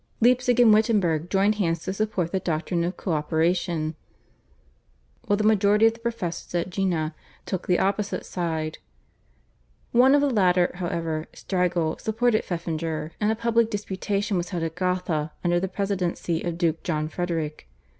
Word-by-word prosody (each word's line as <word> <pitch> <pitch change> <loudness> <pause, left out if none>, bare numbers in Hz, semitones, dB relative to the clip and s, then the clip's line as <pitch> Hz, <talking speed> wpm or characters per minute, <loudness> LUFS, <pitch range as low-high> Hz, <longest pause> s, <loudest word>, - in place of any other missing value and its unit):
Leipzig 245 +1 +3
and 230 -3 +7
Wittenberg 195 -7 +2
joined 200 +2 +3
hands 165 -2 0
to 190 - -3
support 195 -5 -1
the 190 - 0
doctrine 170 0 -1
of 175 +1 -3
co 185 - -3
operation, 160 +1 0 1.3
while 205 - +3
the 215 - 0
majority 210 0 +4
of 225 - +5
the 230 - -15
professors 210 -8 -4
at 175 +1 -1
Jena 175 -5 -1 0.3
took 190 - -4
the 180 - +3
opposite 200 +1 -1
side. 160 -3 -3 1.1
One 255 +3 +6
of 290 - +4
the 285 - +2
latter 180 -5 +3
however, 165 -3 -3
Strigel, 175 -4 -1
supported 225 0 +1
Pfeffinger, 165 -2 -3
and 210 +1 +3
a - - 0
public 230 0 +2
disputation 200 -1 -2
was 175 0 -2
held 170 -2 -3
at 165 -1 -2
Gotha 180 -4 -1
under 175 0 +2
the 190 - -1
presidency 185 -4 -2
of 170 -1 -3
Duke 165 -2 0
John 155 -3 -1
Frederick. 160 - -3
180 Hz, 155 wpm, -25 LUFS, 165-210 Hz, 1.3 s, and